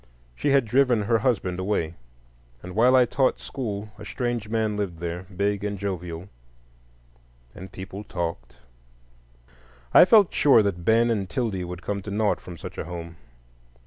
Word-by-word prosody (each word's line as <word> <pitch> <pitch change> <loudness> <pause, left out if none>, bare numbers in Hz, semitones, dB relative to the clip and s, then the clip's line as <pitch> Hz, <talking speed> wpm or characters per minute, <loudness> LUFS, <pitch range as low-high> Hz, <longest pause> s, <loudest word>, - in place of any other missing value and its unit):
She 145 - -1
had 140 -3 +4
driven 120 -1 +3
her 115 +2 +2
husband 100 -7 0
away, 95 -4 -1 0.7
and 90 - -8
while 120 +5 +5
I 125 -1 +6
taught 130 +2 +1
school 105 -5 -5
a - - -8
strange 120 0 -3
man 110 -2 0
lived 100 -5 -3
there, 85 +2 -5
big 100 0 0
and 105 -1 -2
jovial, 90 -3 -5 1.3
and 95 +1 -10
people 95 +2 -8
talked. 85 -11 -5 1.4
I - - +9
felt 205 -2 +5
sure 135 -7 +5
that 95 -4 -2
Ben 115 +4 +3
and 100 -5 -1
'Tildy 110 -7 -2
would 90 0 -7
come 100 -1 -3
to 100 - -8
naught 105 +1 0
from 90 -2 -10
such - - -8
a - - -4
home. 85 -1 -7
100 Hz, 160 wpm, -25 LUFS, 90-115 Hz, 1.4 s, I